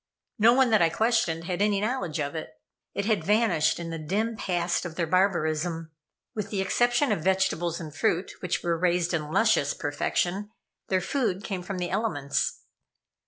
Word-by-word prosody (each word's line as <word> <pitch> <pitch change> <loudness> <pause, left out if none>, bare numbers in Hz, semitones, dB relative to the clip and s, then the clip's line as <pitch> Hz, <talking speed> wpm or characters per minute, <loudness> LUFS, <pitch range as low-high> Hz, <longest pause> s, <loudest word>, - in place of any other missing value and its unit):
No 230 +3 +7
one 260 -2 +4
that 215 - +5
I 165 - +5
questioned 220 -5 +1
had 180 +2 -3
any 205 -1 +3
knowledge 205 - -2
of 145 -1 -2
it. 155 -6 -6 0.4
It 200 - -1
had 220 -1 +1
vanished 195 -8 +2
in 165 -1 -5
the 165 - -4
dim 210 +9 -1
past 175 -4 -1
of 175 -3 -6
their 170 - 0
barbarism. 165 -2 0 0.4
With 210 -2 -4
the 200 - -2
exception 240 +8 +2
of - - 0
vegetables 175 -3 +1
and 155 -2 -8
fruit, 175 +5 0
which 180 -1 -2
were 170 -1 0
raised 175 0 +1
in 150 -2 -2
luscious 195 -4 +3
perfection, 175 +7 -1 0.4
their 185 -1 +1
food 205 -3 -1
came 190 -5 -3
from 190 +1 -5
the 175 -1 -3
elements. 145 -11 -1
180 Hz, 175 wpm, -27 LUFS, 165-210 Hz, 0.4 s, No